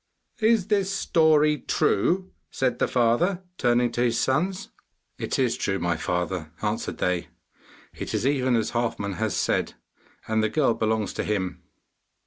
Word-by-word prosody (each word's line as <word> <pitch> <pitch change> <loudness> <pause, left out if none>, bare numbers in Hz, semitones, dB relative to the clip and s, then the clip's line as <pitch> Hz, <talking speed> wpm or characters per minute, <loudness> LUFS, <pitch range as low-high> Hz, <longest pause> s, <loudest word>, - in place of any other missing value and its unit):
'Is 220 -3 +3
this 200 -2 +1
story 155 -5 +3
true?' 185 - +1 0.2
said 130 -2 -1
the - - +2
father, 130 +11 +1 0.2
turning 120 -1 +2
to 120 - -2
his 120 -1 +2
sons. 175 +8 0 0.5
'It - - -2
is 125 -3 +1
true, 95 -6 -1
my 85 -2 0
father,' 90 -1 -2
answered 105 +1 -2
they. 90 -1 -1 0.7
'It - - -6
is - - -1
even 130 -3 +2
as 115 - 0
Halfman 110 -5 -2
has 110 -1 -1
said, - - 0 0.5
and 110 0 +1
the 110 - +1
girl 135 -1 +2
belongs 110 -1 -1
to - - -2
him. 95 -5 -2
120 Hz, 150 wpm, -25 LUFS, 105-155 Hz, 0.7 s, Is